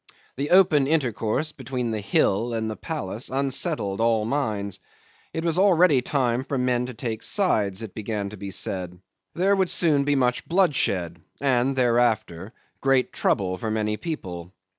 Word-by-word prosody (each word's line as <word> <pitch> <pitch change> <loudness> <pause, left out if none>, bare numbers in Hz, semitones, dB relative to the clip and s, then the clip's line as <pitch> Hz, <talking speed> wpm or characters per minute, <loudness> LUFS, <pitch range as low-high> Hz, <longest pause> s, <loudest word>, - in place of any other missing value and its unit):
The 140 +3 -3
open 175 -7 +5
intercourse 135 -1 0
between 125 -3 -4
the 110 -1 -2
hill 110 +3 +1
and 110 -1 -2
the - - -5
palace 115 - -5
unsettled 135 - -1
all 115 -1 +3
the - - -3
minds. 105 -9 -2 0.5
It 160 +1 -4
was 170 +1 +2
already 180 -8 +5
time 125 -2 0
for 135 0 -3
men 125 -1 0
to 125 - -8
take 110 -1 -4
sides, 105 - +1
it 110 - -8
began 105 -2 -3
to 105 - -9
be 100 +1 -6
said. 90 -2 -3 0.4
There 195 +3 +3
would 190 -2 +1
soon 150 -5 +2
be 145 0 +1
much 125 -2 0
bloodshed, 100 - +1 0.2
and 135 -1 +1
thereafter 115 -7 +1 0.3
great 135 -2 +2
trouble 95 -3 0
for 110 - -3
many 105 -1 -1
people. 95 - -6
120 Hz, 160 wpm, -24 LUFS, 105-145 Hz, 0.5 s, open